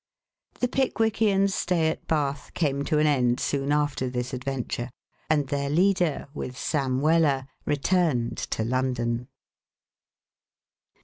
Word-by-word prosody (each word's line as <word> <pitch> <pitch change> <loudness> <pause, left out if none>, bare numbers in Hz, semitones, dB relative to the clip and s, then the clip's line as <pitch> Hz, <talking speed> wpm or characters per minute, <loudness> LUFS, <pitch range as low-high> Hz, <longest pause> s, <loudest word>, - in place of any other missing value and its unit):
The 250 - +3
Pickwickians' 220 -6 +2
stay 170 -4 +1
at 160 - -5
Bath 145 -3 -1
came 140 -4 0
to 155 - +1
an 150 - +3
end 125 -4 +2
soon 140 0 -1
after 145 -3 0
this 125 +1 -3
adventure, 125 -1 -3 0.4
and 150 -3 +2
their 140 -1 -1
leader, 175 -1 +2
with 130 -4 -6
Sam 135 -3 0
Weller, 150 -4 +3 0.2
returned 145 -5 +1
to 110 - -1
London. 120 -1 -1
140 Hz, 120 wpm, -26 LUFS, 130-165 Hz, 0.4 s, The